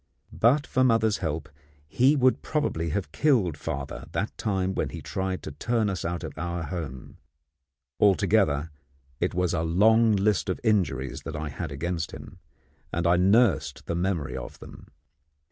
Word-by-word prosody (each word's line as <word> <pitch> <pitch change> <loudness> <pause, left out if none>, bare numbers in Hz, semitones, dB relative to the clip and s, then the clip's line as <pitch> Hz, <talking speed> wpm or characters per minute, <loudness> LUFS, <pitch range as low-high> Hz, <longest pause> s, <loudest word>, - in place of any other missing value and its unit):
But 140 +6 +3
for 130 -4 +1
mother's 115 -4 +3
help, 80 -2 -3 0.4
he 130 - +3
would 130 -2 +3
probably 115 - -1
have 95 +5 -3
killed 115 - +2
father 70 -2 -5
that 105 - -2
time 95 -3 -1
when - - -1
he - - -7
tried 95 -1 -3
to - - -6
turn 110 - 0
us 90 -4 -4
out 85 +1 -3
of - - -6
our 85 0 -3
home. 75 -5 -6 0.8
Altogether, 95 -7 +3 0.5
it 90 0 -1
was 90 -1 +1
a - - 0
long 110 +7 +4
list 100 0 +1
of 95 - -1
injuries 85 - 0
that 80 - -6
I 75 0 -4
had 70 - -5
against 80 +3 -3
him, - - -10 0.5
and 85 +1 -1
I 85 +1 +5
nursed 90 - +3
the - - -3
memory 85 -4 -1
of - - -7
them. - - -13
90 Hz, 160 wpm, -26 LUFS, 80-110 Hz, 0.8 s, I